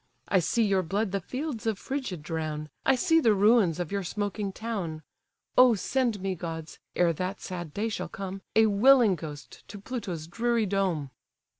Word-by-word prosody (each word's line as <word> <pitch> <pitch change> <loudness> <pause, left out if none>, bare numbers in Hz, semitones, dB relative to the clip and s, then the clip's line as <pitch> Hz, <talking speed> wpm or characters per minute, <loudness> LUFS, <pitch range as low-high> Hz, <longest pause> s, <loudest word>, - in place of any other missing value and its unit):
I 190 - +3
see 230 +7 +1
your 195 -3 +2
blood 195 +4 -1
the 195 - 0
fields 255 - -4
of 220 -3 0
Phrygia 260 -5 -4
drown, 155 -1 -4 0.2
I 270 - +6
see 325 +4 +3
the 225 -9 +4
ruins 200 -4 +4
of 175 -3 -3
your 200 -1 -1
smoking 205 +2 -3
town! 190 -8 -4 0.5
O 250 -2 +7
send 235 0 0
me, 195 0 -1
gods! 165 -2 -6 0.2
ere 175 -1 +3
that 185 +5 -3
sad 175 -4 -6
day 210 +7 -2
shall 220 - -4
come, 195 0 -6
A 220 0 +6
willing 220 +1 +5
ghost 150 -3 -9
to 205 - -9
Pluto's 195 -8 -5
dreary 230 +5 0
dome!" 185 -8 -1
195 Hz, 175 wpm, -28 LUFS, 175-225 Hz, 0.5 s, O